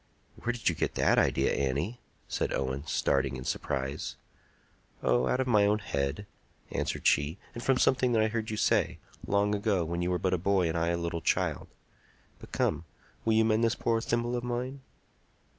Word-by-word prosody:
"Where 120 - -1
did 120 -2 -4
you 85 - +4
get - - -2
that - - +4
idea, - - +2
Annie?" 70 - -1 0.3
said - - -1
Owen, 70 +2 -2
starting 70 -2 +1
in 65 - -7
surprise. 65 +2 -3 0.9
"Oh, 60 +1 +3
out 125 - +1
of 130 - +1
my 105 -5 +4
own 105 +1 +3
head," 70 -2 -2 0.5
answered - - -2
she, 75 +5 +3 0.2
"and 120 - -6
from 135 +1 +2
something 130 -1 +3
that 110 -1 +4
I - - +3
heard 110 0 -3
you 110 - -3
say, - - +2 0.3
long 100 +1 +2
ago, 100 -4 +1
when 85 +2 -2
you 90 - 0
were 90 - +1
but 95 +2 0
a 90 - +1
boy 95 -1 +2
and 80 - -2
I 85 0 +1
a 85 0 +1
little 85 -1 -3
child. - - 0 0.7
But - - -13
come, 80 +3 0 0.4
will 110 - +3
you 110 0 +4
mend 110 +1 +2
this 115 0 +2
poor 115 -1 0
thimble 120 +1 0
of 120 - -2
mine?" 125 +3 -3
100 Hz, 195 wpm, -29 LUFS, 80-115 Hz, 0.9 s, you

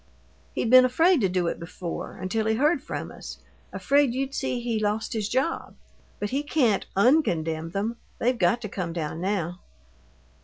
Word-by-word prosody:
"He'd 225 - 0
been 255 0 +9
afraid 320 +5 +4
to 195 - +2
do 180 -1 0
it 170 - -2
before, 170 +1 -6
until 220 +4 -2
he 220 - +2
heard 300 +8 +2
from - - -5
us - - -9 0.3
afraid 280 -3 +2
you'd 270 +1 -2
see 260 -3 -1
he 235 -2 -1
lost 215 +1 -1
his 215 -2 -2
job. 265 +6 -1 0.4
But 205 - -3
he 275 +2 0
can't 265 -9 +1
un 250 +11 +5
condemn 160 - -2
them 210 +6 -2 0.2
they've 250 +2 +1
got 185 +7 +2
to - - -2
come 180 -4 -4
down 160 -1 -4
now." 180 -2 -2
220 Hz, 180 wpm, -26 LUFS, 180-255 Hz, 0.4 s, been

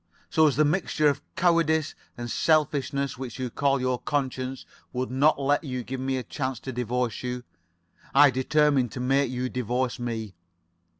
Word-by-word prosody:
"So 160 -1 +5
as 145 - +1
the 155 - +4
mixture 155 -2 +2
of 140 -1 -2
cowardice 165 -3 +2 0.2
and 120 0 -5
selfishness 140 -4 +1
which 130 -3 -6
you 130 -2 -3
call 140 +1 +1
your 125 -1 0
conscience 130 -2 -2 0.3
would 125 0 -2
not 140 +3 +3
let 145 +2 +1
you 125 -4 -4
give 130 +3 -5
me 130 0 -1
a 130 - -3
chance 130 +1 -3
to 130 - -5
divorce 125 0 -2
you, 125 0 -4 0.7
I 145 0 +7
determined 135 -1 +2
to - - -5
make 135 +1 +2
you 125 0 -2
divorce 125 +1 -2
me. 115 -4 -4
130 Hz, 170 wpm, -26 LUFS, 125-145 Hz, 0.7 s, I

